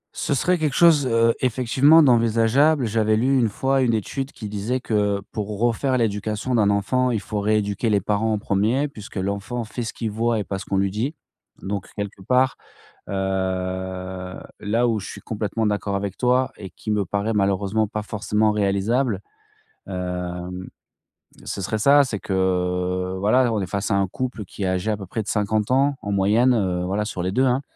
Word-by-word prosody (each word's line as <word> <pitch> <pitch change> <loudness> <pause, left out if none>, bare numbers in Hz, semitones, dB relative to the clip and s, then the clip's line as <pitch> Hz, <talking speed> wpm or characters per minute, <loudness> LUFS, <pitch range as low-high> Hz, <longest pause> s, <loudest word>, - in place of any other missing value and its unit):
Ce 145 - -1
serait 180 +5 +1
quelque 150 -3 0
chose, 155 -6 +5
heu, 115 0 +3
effectivement 130 +6 +4
d'envisageable. 120 +3 +3
J'avais 110 0 +2
lu 130 +5 +2
1 115 -3 +2
fois, 135 +5 +1
1 115 -3 +2
étude 135 +6 -3
qui 105 - -8
disait 105 +5 -2
que 105 -4 0
pour 105 -2 -4
refaire 120 +3 +1
l'éducation 110 +2 -1
d'un 105 -4 +3
enfant, 125 +6 +1
il 115 -4 0
faut 105 +1 -4
rééduquer 105 +1 0
les 105 -2 +3
parents 105 +3 0
en - - +1
1er 110 +9 +1
puisque 105 -7 -12
l'enfant 100 +5 -3
fait 115 +3 -6
ce 115 - -3
qu'il 110 -3 -4
voit 115 +1 0
et 105 - -1
pas 95 -1 -4
ce - - -8
qu'on 100 - -1
lui 95 0 +1
dit, 120 - -2 0.5
donc 100 -1 -3
quelque 100 -1 -5
part, 130 +5 +2 0.5
heu, - - -4 1.5
là 115 +4 +1
où 110 -2 +1
je 95 - -6
suis - - -9
complètement 110 0 -2
d'accord 105 -1 -1
avec 100 -1 -3
toi 130 +1 +2
et 95 -3 -9
qui 110 - -7
me 105 -1 +1
paraît, 100 +4 -1
malheureusement, 100 +2 +1
pas 105 +1 -4
forcément 105 +1 0
réalisable, 105 +5 +1 0.7
hem, 90 0 -4 0.8
ce 100 - -4
serait 110 +4 -1
ça. 140 +6 +6
C'est 110 -7 -3
que, 90 -1 -1
voilà, 120 +4 +3
on 105 - 0
est 95 - -3
face 100 +4 -2
à 100 - +3
un 100 -1 +2
couple 125 +1 -4
qui 100 +1 -7
est - - +1
âgé 95 +3 -1
à 105 - 0
peu 100 - -7
près 110 +5 -3
de 105 - -9
50 105 +1 0
ans 135 +2 +2
en 100 - -4
moyenne, 110 +6 +3
heu, 90 -4 0
voilà, 100 +3 -1
sur 95 -4 -4
les 90 +1 -1
2, 130 +5 +2
hein 130 +2 +2
105 Hz, 195 wpm, -23 LUFS, 100-125 Hz, 1.5 s, ça